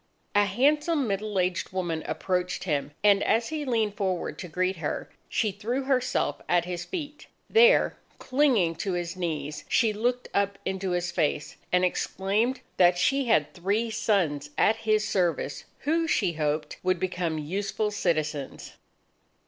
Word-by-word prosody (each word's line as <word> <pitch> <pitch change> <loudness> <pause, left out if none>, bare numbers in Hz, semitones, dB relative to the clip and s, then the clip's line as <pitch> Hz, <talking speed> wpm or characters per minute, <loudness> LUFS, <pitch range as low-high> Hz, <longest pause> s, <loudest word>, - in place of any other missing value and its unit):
A 205 0 +4
handsome 290 - +2
middle 205 0 -2
aged 180 -1 0
woman 175 -4 -2
approached 180 -1 -1
him, 145 -6 -1
and 200 -1 +5
as 225 +1 +1
he 310 -2 -3
leaned 220 -5 0
forward 185 -3 -2
to 180 - -5
greet 185 +3 -1
her, 155 -3 -4 0.2
she 215 - +1
threw 230 +7 -2
herself 260 -2 0
at 175 -1 +3
his 175 -1 -4
feet. 300 -5 -6 0.2
There, 475 +2 +5 0.2
clinging 255 - +2
to 190 +2 -2
his 175 0 -3
knees, 155 -4 -3
she 225 -3 +3
looked 245 +4 -1
up 200 0 +1
into 190 0 -2
his 175 -1 -1
face, 150 -3 -1 0.2
and 180 0 +4
exclaimed 205 +7 0 0.2
that 175 -1 +5
she 275 +7 +2
had 155 -11 +2
three 205 +6 -1
sons 165 -10 0
at 220 - +4
his 215 -1 +1
service, 170 -8 -1 0.2
who, 325 +3 +1
she 195 - +1
hoped, 150 -1 -2
would 185 -1 +1
become 180 -3 -1
useful 195 +7 -2
citizens. 155 -8 -2
190 Hz, 150 wpm, -27 LUFS, 175-225 Hz, 0.2 s, and